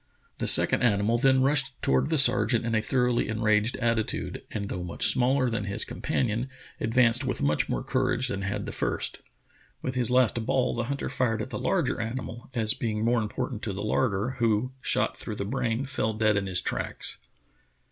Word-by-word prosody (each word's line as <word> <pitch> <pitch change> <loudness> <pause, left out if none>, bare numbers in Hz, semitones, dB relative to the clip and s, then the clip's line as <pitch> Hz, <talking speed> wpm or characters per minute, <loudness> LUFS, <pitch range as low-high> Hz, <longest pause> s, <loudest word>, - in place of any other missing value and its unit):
The - - -1
second - - +5
animal 110 0 +2
then 130 0 +3
rushed 135 -2 +1
toward 65 0 +2
the - - +1
sergeant - - +4
in 115 - -2
a 110 - +2
thoroughly 125 -1 0
en 110 0 -3
raged 110 +2 +2
attitude, 115 -3 -2
and 100 -2 -4
though 90 - -4
much 85 -1 0
smaller 130 +1 +4
than 115 -3 -2
his 100 - -1
com - - -9
panion 120 +1 -1 0.3
advanced 120 +2 +2
with 130 - -3
much 75 +1 +1
more - - -2
courage 125 +2 0
than 100 -6 -3
had 100 +2 -3
the - - -5
first. - - -2 0.6
With 130 - -2
his 125 -3 +2
last 125 -2 +3
ball 130 +2 0
the 120 0 -2
hunter 140 +2 -3
fired 115 -4 -1
at 130 - -9
the - - -4
larger 165 -11 0
animal, 120 +1 -6
as 110 -2 +4
being 110 -5 -2
more 120 0 +2
important 115 +2 -4
to 105 - -3
the 100 - -5
larder, 110 +2 -1
who, 115 +2 +1
shot - - 0
through 105 - -6
the 100 - -4
brain, 120 +2 -2
fell 130 -5 -1
dead 110 -1 +2
in 100 -1 -1
his 90 -2 +2
tracks. - - -4
115 Hz, 200 wpm, -27 LUFS, 105-125 Hz, 0.6 s, second